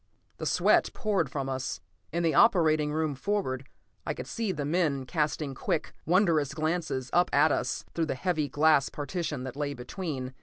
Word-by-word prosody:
The - - -3
sweat - - +4
poured 195 - 0
from 135 0 -3
us. 130 -1 -3 0.3
In 170 +1 -1
the 165 -2 +2
operating 155 -8 +4
room 155 -1 0
forward, 135 -5 -2 0.3
I - - -3
could - - -6
see 225 -4 -2
the 150 -5 -3
men 150 -4 0
casting 150 -1 -1
quick, - - -2
wondering 170 -5 +3
glances 155 -5 -2
up 175 +1 +4
at 145 +2 +4
us - - -1
through 165 -1 0
the - - -1
heavy 155 -1 -1
glass 150 0 +4
partition 150 -2 -4
that 130 -1 -6
lay 145 -1 -2
between. 130 -1 -5
155 Hz, 175 wpm, -29 LUFS, 140-170 Hz, 0.3 s, sweat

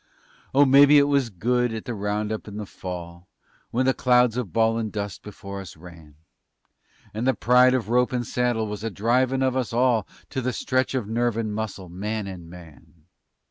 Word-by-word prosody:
Oh, 145 +1 +6
mebbe 140 +1 +7
it 145 -1 +7
was 140 -4 +1
good 120 +5 0
at 110 -1 -6
the 120 - -4
roundup 105 +1 -3
in 105 0 -8
the 105 - -5
Fall 90 -1 -8 0.4
When 130 +3 0
the 130 - +3
clouds 125 -2 +3
of 120 -8 -3
bawlin' 115 +2 +1
dust 100 -4 -5
before 100 -1 -8
us 90 - -11
ran, 80 -3 -14 1.0
And 110 +4 -2
the 130 - +3
pride 125 +2 +4
of 125 -4 -2
rope 125 +2 +2
and 125 -1 -2
saddle 120 -1 0
was 105 0 -6
a 115 - -1
drivin' 125 +6 +1
of 130 -1 +1
us 130 -3 -2
all 120 -2 +2 0.2
To 135 - -2
a 125 0 -2
stretch 130 +3 -1
of 120 -6 -2
nerve 120 0 0
and 110 -2 -2
muscle, 105 -3 -5
man 105 +4 -4
and 90 -4 -9
man. 85 -2 -15
110 Hz, 190 wpm, -24 LUFS, 100-125 Hz, 1.0 s, mebbe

